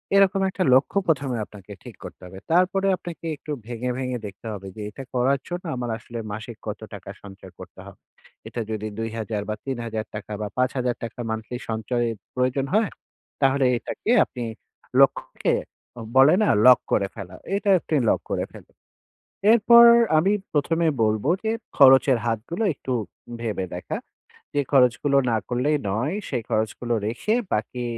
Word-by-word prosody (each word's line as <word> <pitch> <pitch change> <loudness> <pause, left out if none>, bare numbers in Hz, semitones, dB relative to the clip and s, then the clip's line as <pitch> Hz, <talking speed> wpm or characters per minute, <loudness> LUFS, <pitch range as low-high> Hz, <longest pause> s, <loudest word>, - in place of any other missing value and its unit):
এরকম 195 0 +4
একটা 190 - -1
লক্ষ্য 135 +9 +3
১ম 145 -4 +1
এ - - -2
আপনাকে 105 -1 -14
ঠিক - - -10
করতে - - -10
হবে 95 +1 -10
তারপরে 185 +3 +3
আপনাকে 170 -1 -9
একটু 150 - -8 0.2
ভেঙে, 125 +1 -3
ভেঙে 125 -1 -2
দেখতে 100 +3 -11
হবে 100 -1 -8
যে 105 - -6
এটা 135 +6 -9
করার 130 +3 +2
জন্য 175 +1 -5
আমার 125 -1 -3
আসলে 115 0 -8
মাসিক 110 +2 -7
কত 105 - -4
টাকা 100 -1 -9
সঞ্চয় 100 -1 -12
করতে - - -12
হবে। - - -13 0.5
এটা 120 - -4
যদি 110 0 -3
২,০০০ 110 -2 -3
বা 105 - -1
৳৩০০০ 115 -5 -3
টাকা 105 0 -7
বা 105 - -2
৳৫০০০ 125 -1 0
টাকা 115 +2 -7
monthly 110 +2 -4
সঞ্চয়ের 115 +1 -1 0.2
প্রয়োজন 130 +1 +1
হয়, 215 -1 +3 0.5
তাহলে 135 0 +3
এটাকে 220 - -3
আপনি 125 - -7 0.6
লক্ষ্যকে - - +2 0.6
বলে 140 +5 +7
না - - +2 0.2
লক 125 - +8
করে 100 - +2
ফেলা। 95 -4 -8 0.2
এটা 205 0 -1
আপনি 155 - -2
লক - - +2
করে - - 0
ফেলুন। - - -15 0.8
এরপর 235 +1 +8 0.3
আমি 190 +6 +3 0.2
১ম 155 +3 +1
এ - - +4
বলবো, 110 +4 0 0.2
যে 220 - +1 0.2
খরচের 130 -2 +7
হাতগুলো 120 - -2
একটু 130 -1 -5 0.5
ভেবে 105 -5 -2
দেখা। 90 - -4 0.6
যে 145 - +2
খরচগুলো 135 +1 +4
না 115 - +2
করলেই 130 +5 +1
নয় 125 - -1
সেই 120 -4 -2
খরচগুলো 110 +2 -1
রেখে 125 - -1 0.2
বাকি 120 +3 -2
125 Hz, 160 wpm, -24 LUFS, 110-145 Hz, 0.8 s, লক